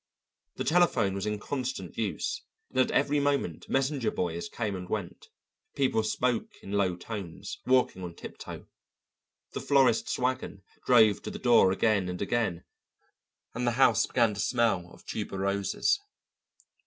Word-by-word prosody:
The - - -3
telephone 170 - +3
was 100 +2 -3
in 105 0 -1
constant 125 -5 -4
use, 110 -3 -2 0.3
and 130 - -1
at 130 - +4
every 145 +1 +2
moment 140 0 -1
messenger 135 -2 +1
boys 85 -1 -3
came 105 -4 -3
and 90 -1 -7
went, 100 -5 -4 0.5
people 130 -5 +2
spoke 120 +2 -1
in 95 - -8
low 100 -3 +1
tones, 95 0 -7
walking 125 -7 +3
on 85 -1 -6
tiptoe; - - -9 0.9
the - - -5
florist's 145 - +3
wagon 125 -6 -2 0.2
drove 110 -5 +6
to - - -5
the - - -6
door 120 -6 +5
again 100 -1 +1
and 90 0 -4
again, 100 -5 -1 0.9
and 125 +1 -2
the 120 - +2
house 115 -4 +5
began 115 -3 +2
to 100 - -7
smell 105 -6 +1
of - - -17
tuberoses. 100 - 0
110 Hz, 145 wpm, -29 LUFS, 95-130 Hz, 0.9 s, drove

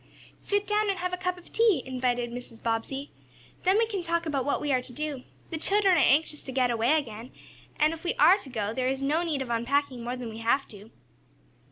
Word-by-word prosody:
"Sit 410 0 0
down 420 0 +1
and 390 - 0
have 360 0 -3
a - - +2
cup 365 0 -2
of 355 - -16
tea," 440 - +3
invited 250 -2 -1
Mrs. 240 -1 -9
Bobbsey. 235 +5 -2 0.5
"Then 375 +2 +3
we 455 - +4
can 410 -4 -3
talk 335 0 -1
about 280 -5 -1
what 285 - +1
we 295 - -1
are 255 - +2
to 250 - -9
do. 290 -1 -5 0.3
The 320 - -3
children 390 +1 +3
are - - +4
anxious 300 +1 +3
to 265 - -7
get 255 -1 +2
away 235 +6 +3
again, 235 -4 -5 0.5
and 305 +2 +3
if 325 - -9
we 350 - -1
are 385 +4 +6
to 290 - -10
go 215 -4 -2
there 255 +1 -1
is 270 +1 -1
no 300 +4 +2
need 310 -6 -1
of 240 - -7
unpacking 250 +2 0
more 245 +1 -3
than 250 -2 -6
we 220 0 -8
have 235 +5 +1
to." 210 +1 -13
280 Hz, 235 wpm, -28 LUFS, 245-345 Hz, 0.5 s, are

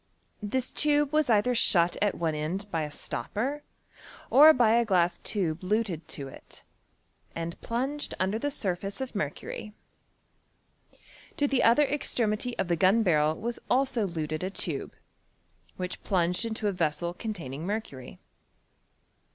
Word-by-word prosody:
This 250 +5 -2
tube 295 -1 +2
was 305 -3 +2
either 225 +3 +3
shut 175 -7 +4
at 205 -1 +2
one 165 -2 -1
end 160 +7 -3
by 165 - 0
a 150 - -3
stopper, 215 - -3 0.7
or 300 +4 +9
by 240 -6 +4
a 235 +1 +4
glass 180 -5 +2
tube 175 -6 -2
luted 185 -4 -1
to 140 -2 -6
it, 135 - -13 0.7
and 165 0 -5
plunged 270 +5 -3
under 195 +4 0
tlie 290 +4 -2
surface 195 -3 -3
of 265 -1 -5
mer 155 -9 0
cury. 210 +7 -8 1.6
To 290 - +2
llie 275 -2 +1
other 235 +6 +5
extremity 245 -4 -1
of - - -1
the 170 -1 +1
gnn 195 +7 +4
barr^ 155 -4 +2
was 235 +2 -4
also 255 -5 +1
luted 155 -2 -3
a 185 - -1
tube, 195 - -3 0.8
which 180 0 -4
pluuged 180 +2 +1
into 220 -1 -2
a - - +2
vessel 170 -1 -1
containing 170 - -6
mercury. 195 - -5
200 Hz, 145 wpm, -28 LUFS, 170-240 Hz, 1.6 s, or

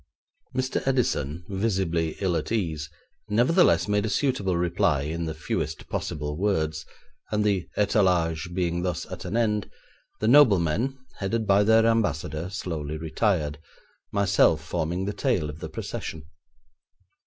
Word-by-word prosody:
Mr. 130 0 0
Edison, 85 - 0
visibly 95 -5 -1
ill 95 -3 +1
at - - -2
ease, 80 -9 -1 0.4
nevertheless 120 - +4
made 105 0 +1
a 110 - -1
suitable 105 - 0
reply 85 -3 +1
in 80 +4 -3
the 80 -1 -4
fewest 80 0 -3
possible 75 0 -3
words, 80 -5 0 0.4
and 105 -1 +1
the 100 -4 +1
étalage 90 -6 +2
being 85 -2 0
thus 90 0 -2
at 90 - -7
an 95 +6 -2
end, 105 -3 +1 0.5
the 110 - 0
noblemen, 120 - +4 0.2
headed 110 +3 -1
by 100 0 +4
their 110 +1 +5
Ambassador, 90 -7 0
slowly 80 -6 -4
retired, 80 -2 0 0.5
myself 100 -1 +3
forming 85 +3 -2
the 105 - -2
tail 80 -6 0
of 75 - -12
the - - -6
procession. 80 -2 -5
90 Hz, 135 wpm, -26 LUFS, 80-105 Hz, 0.5 s, their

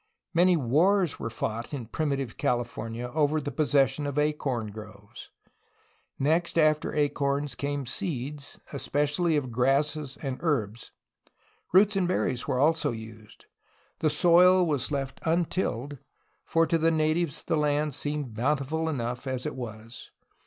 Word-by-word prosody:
Many 175 +1 +4
wars 165 +6 +2
were 115 - -3
fought 115 +4 -4
in 125 -4 -6
primitive 140 -1 -2
California 120 0 -2
over 155 0 +2
the 145 -1 -4
possession 145 -2 +2
of 140 0 -4
acorn 140 -7 -1
groves. 105 -1 -11 0.9
Next 165 +5 +1
after 155 -1 +2
acorns 145 -1 0
came 140 +2 -3
seeds, 145 - -4 0.2
especially 150 +4 0
of 130 -4 -3
grasses 140 +3 0
and 135 -3 -4
herbs. 115 -9 -1 0.8
Roots 200 +3 +5
and 190 -2 +1
berries 130 -8 0
were - - 0
also 160 +1 +3
used. 110 -1 -11 0.5
The 155 - +2
soil 180 +4 +5
was 145 -6 -1
left 135 -2 -3
untilled, 160 -5 -1 0.5
for 165 0 +2
to 165 0 +1
the 165 +1 +3
natives 155 -1 0
the 165 - 0
land 150 0 +1
seemed 145 -3 -3
bountiful 145 +6 0
enough 125 -2 -3
as 130 0 -3
it 150 - -2
was. 115 -2 -8
145 Hz, 135 wpm, -27 LUFS, 125-160 Hz, 0.9 s, Roots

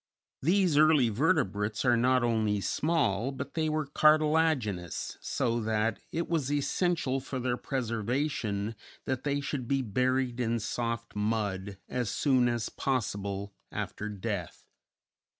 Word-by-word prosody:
These 175 -1 +3
early 155 -6 +5
vertebrates 105 - +1
are 120 -1 +5
not 125 +1 +3
only 110 -3 +1
small, 135 - +1
but 140 +1 -6
they 160 -1 0
were 155 -1 0
cartilaginous, 150 - +2
so 115 0 0
that 110 0 0
it 170 +1 -2
was 150 -5 0
essential 145 -1 +1
for 135 0 -5
their 125 -1 0
preservation 115 -3 -2 0.3
that 130 -2 -2
they 145 0 +1
should 140 -3 -3
be 135 0 +1
buried 125 +2 0
in 115 -1 +1
soft 115 +1 -3
mud 105 -2 -1
as 125 -4 -2
soon 130 -4 +3
as 120 -1 -1
possible 100 -5 -2 0.2
after 105 - -4
death. 100 -3 -4
125 Hz, 130 wpm, -30 LUFS, 105-140 Hz, 0.3 s, early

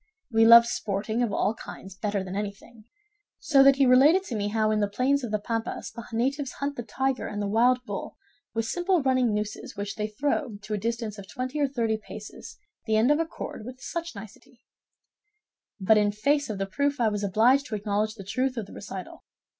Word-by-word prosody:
We 225 0 +5
loved 235 0 +10
sporting 220 0 -2
of 235 -4 +1
all 205 - +1
kinds 195 -3 -10
better 205 0 -2
than 190 0 -6
anything; 210 +2 -6 0.5
so 275 -3 +4
that 275 0 +7
he 275 0 +3
related 280 +9 +6
to 250 - -5
me 205 -1 -1
how 215 0 +1
in 215 - +1
the 205 - +2
plains 260 +6 +1
of 240 - -3
the 215 - 0
Pampas 225 +2 -4
the 235 +1 -8
natives 265 +4 -1
hunt 280 0 -3
the 240 - -4
tiger 265 +2 -2
and 205 -1 -5
the 205 - -1
wild 245 +4 +3
bull - - -6 0.4
with 225 0 0
simple 350 +3 +1
running 255 -3 +2
nooses 210 0 -4
which 200 0 -3
they 210 0 -1
throw 260 +1 -2
to 215 - -5
a - - 0
distance 225 -1 -3
of 195 - -10
twenty 255 +4 -4
or 285 - +3
thirty 230 -5 -1
paces 215 0 -10 0.3
the 220 - +2
end 225 +6 +4
of 295 - +3
a 330 - 0
cord 220 - -7
with 255 +3 -9
such 335 +1 -5
nicety; 225 +4 -13 1.2
but 210 +3 +4
in 205 0 +2
face 285 +7 +1
of 210 - -3
the 195 - -1
proof 280 +8 -1
I 235 - +3
was 205 -1 -3
obliged 235 +8 +3
to 225 - -3
acknowledge 210 +1 -1
the 200 - -9
truth 255 +6 -1
of 225 - -3
the - - -14
recital. 195 -2 -8
225 Hz, 215 wpm, -26 LUFS, 210-260 Hz, 1.2 s, loved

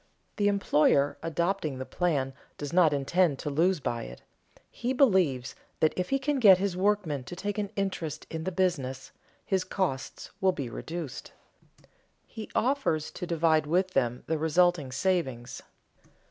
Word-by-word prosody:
_ - - -42
The 205 - +2
employer 150 -8 +2
adopting 170 -3 -1
the 130 - -5
plan 140 -7 -1 0.2
does 145 0 -6
not 170 -3 +5
intend 145 +2 +1
to 150 +2 -4
lose 170 +4 +2
by 120 -4 -3
it; - - -11 0.5
he 245 +2 -2
believes 185 - +2 0.3
that 155 - +3
if 180 -1 -2
he 275 - +2
can 275 +1 -1
get 200 -6 +8
his 190 -1 -1
workmen 185 -8 0
to 175 - -7
take 205 +3 -3
an 205 -1 -2
interest 175 -6 -3
in 160 0 -4
the 185 - -2
business 140 -8 -1 0.3
his 190 -2 +1
costs 165 -11 -3
will 190 -1 +3
be 135 -8 -5
reduced. 160 -3 -6 0.9
He 220 - -9
offers 245 - 0
to 180 - -6
divide 160 -2 +2
with 185 +4 +1
them 125 -5 0
the 160 -1 -1
resulting 160 -3 +2
savings. 135 -5 -1
170 Hz, 160 wpm, -28 LUFS, 145-190 Hz, 0.9 s, get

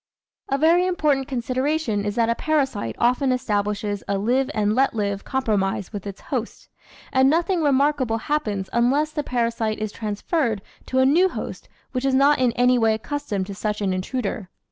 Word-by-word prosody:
A 275 - +1
very 335 +5 +4
important 295 -7 +1
consideration 255 -2 -1
is 205 0 -2
that 230 -1 +2
a 230 - +2
parasite 270 - -1
often 250 +3 +2
establishes 205 -4 -1
a 200 - 0
live 250 +6 +1
and 210 -1 +1
let 265 +1 +2
live 200 -2 -2
compro 260 -6 0
mise 195 +1 -2
with 205 -1 -5
its 195 - -8
host, 245 -4 -5 0.4
and 265 +1 +5
nothing 340 +3 +1
remarkable 280 -4 +2
happens 215 -8 -2
unless 275 +6 +2
the 305 - -2
parasite 230 -4 -1
is 215 -1 -3
transferred 220 - -2 0.2
to 260 - -2
a 260 - +5
new 345 +8 +4
host - - -7 0.2
which 255 -1 -2
is 270 -1 +2
not 280 +2 +4
in 250 -2 +3
any 250 0 +3
way 225 -1 +3
accustomed 220 -5 -3
to 200 - -7
such 210 +1 -3
an 195 -3 0
intruder. 195 0 -3
245 Hz, 180 wpm, -23 LUFS, 210-275 Hz, 0.4 s, and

